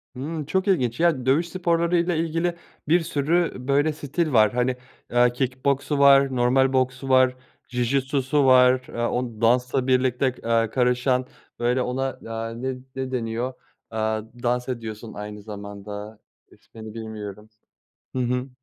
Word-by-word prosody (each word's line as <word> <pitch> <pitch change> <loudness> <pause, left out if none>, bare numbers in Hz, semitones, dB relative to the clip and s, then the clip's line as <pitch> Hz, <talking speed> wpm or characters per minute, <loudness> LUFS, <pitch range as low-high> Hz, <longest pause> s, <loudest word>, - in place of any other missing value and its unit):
Hımm, 150 +4 -4
çok 190 +6 -1
ilginç, 130 - +1
ya, 165 -7 +2
dövüş 155 +6 +2
sporları 170 -1 +1
ile 170 0 +1
ilgili 165 +2 -1 0.3
bir 170 +3 +4
sürü, 165 +2 0
böyle, 145 +3 +2
stil 150 +2 -2
var. 110 -1 +5
Hani, 125 +1 +1 0.4
eee, 120 0 +4
kick 130 +1 -3
boksu 140 +1 +1
var, 140 -1 +6
normal 130 +2 +3
boksu 130 +1 0
var, 130 -1 +5 0.3
Jiu-Jitsu'su 135 +3 +1
var, 130 0 +6
eee, - - -11
o 120 -1 -2
dansla 125 +2 +2
birlikte, 130 0 +2 0.2
eee, 115 -1 +2
karışan, 125 +1 +1 0.3
böyle, 120 +2 +1
ona, 130 +2 -1
eee, 115 +1 -5
ne 130 0 -2 0.2
ne 130 -1 -4
deniyor, 120 +1 -2 0.4
eee, 110 - -5 0.5
dans 125 +1 0
ediyorsun 115 -2 -6
aynı 105 0 -7
zamanda 105 0 -8 0.3
ismini 110 -1 -12
bilmiyorum. 110 -2 -8 0.7
Hı 130 - +1
hı. 125 +2 -1
130 Hz, 140 wpm, -24 LUFS, 115-140 Hz, 0.7 s, var